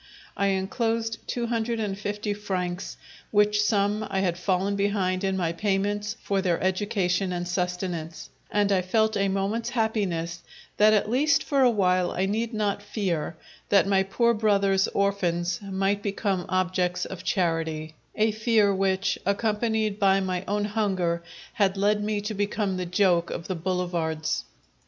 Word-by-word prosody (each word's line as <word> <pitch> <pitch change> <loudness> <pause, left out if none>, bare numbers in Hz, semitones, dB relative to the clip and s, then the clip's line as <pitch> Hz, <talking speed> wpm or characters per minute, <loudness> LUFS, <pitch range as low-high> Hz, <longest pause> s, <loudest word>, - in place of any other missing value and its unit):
I 200 - +1
enclosed 225 +4 -1
two 240 -1 -2
hundred 230 0 -1
and 205 -3 -2
fifty 205 +1 -3
francs, 185 -3 -4 0.3
which 210 0 +3
sum 210 0 +1
I 195 -1 0
had 180 -3 +1
fallen 190 +2 0
behind 200 -2 0
in 190 -1 0
my 170 -3 0
payments 205 +2 -1
for 195 -1 0
their 175 -3 +1
education 190 -1 0
and 175 0 -3
sustenance, 180 -2 -3 0.2
and 205 -1 +1
I 190 -2 +3
felt 220 +4 +1
a 200 -1 +2
moment's 195 +4 -1
happiness 185 -8 -1 0.4
that 210 +1 +6
at 210 - +2
least 280 +6 +2
for 280 -2 +1
a 255 - +6
while 185 -5 +2
I 185 - -1
need 220 +4 -1
not 210 -3 -1
fear 190 -6 -2 0.3
that 200 -1 +5
my 195 -1 +3
poor 235 +5 +2
brother's 200 -3 +2
orphans 180 -3 0
might 195 0 -1
become 195 -2 -1
objects 180 -1 0
of 185 -1 -8
charity 165 -4 -1 0.2
a 220 0 +2
fear 215 -2 +3
which, 190 0 0
accompanied 215 +1 0
by 195 -1 +4
my 185 -1 -2
own 205 +1 0
hunger, 190 -5 0 0.3
had 200 -2 +1
led 205 +1 +2
me 210 -1 -1
to 210 +2 -4
become 205 -1 -1
the 180 -1 -3
joke 180 -1 +2
of 170 - -5
the 185 - -1
boulevards. 170 - -2
195 Hz, 155 wpm, -26 LUFS, 180-210 Hz, 0.4 s, that